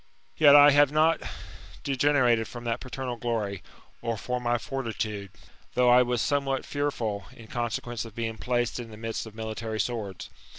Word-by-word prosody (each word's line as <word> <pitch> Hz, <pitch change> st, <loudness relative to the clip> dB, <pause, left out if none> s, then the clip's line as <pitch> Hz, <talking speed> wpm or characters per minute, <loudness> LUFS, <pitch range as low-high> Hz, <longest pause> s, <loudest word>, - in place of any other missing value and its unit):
Yet 145 Hz, -2 st, +7 dB
I 145 Hz, 0 st, +9 dB
have 145 Hz, 0 st, +5 dB
not 155 Hz, +2 st, +3 dB, 0.6 s
degenerated 130 Hz, -5 st, +2 dB
from 120 Hz, -1 st, -9 dB
that 115 Hz, -1 st, -1 dB
paternal 130 Hz, -1 st, -5 dB
glory, 110 Hz, -5 st, -2 dB, 0.4 s
or 115 Hz, -1 st, -2 dB
from 125 Hz, +3 st, -3 dB
my 120 Hz, 0 st, +1 dB
fortitude, 110 Hz, -5 st, -4 dB, 0.5 s
though 125 Hz, -1 st, +5 dB
I 125 Hz, +1 st, +7 dB
was 125 Hz, -2 st, +1 dB
somewhat 140 Hz, -2 st, 0 dB
fearful, 120 Hz, -8 st, -2 dB
in 115 Hz, -, -13 dB
consequence 120 Hz, 0 st, -3 dB
of 115 Hz, -2 st, -11 dB
being 115 Hz, -1 st, -3 dB
placed 120 Hz, -1 st, -1 dB
in 120 Hz, -2 st, -7 dB
the 110 Hz, -, -11 dB
midst 115 Hz, 0 st, -4 dB
of 110 Hz, -, -12 dB
military 110 Hz, 0 st, -4 dB
swords. 110 Hz, -6 st, -3 dB
120 Hz, 165 wpm, -27 LUFS, 110-130 Hz, 0.6 s, I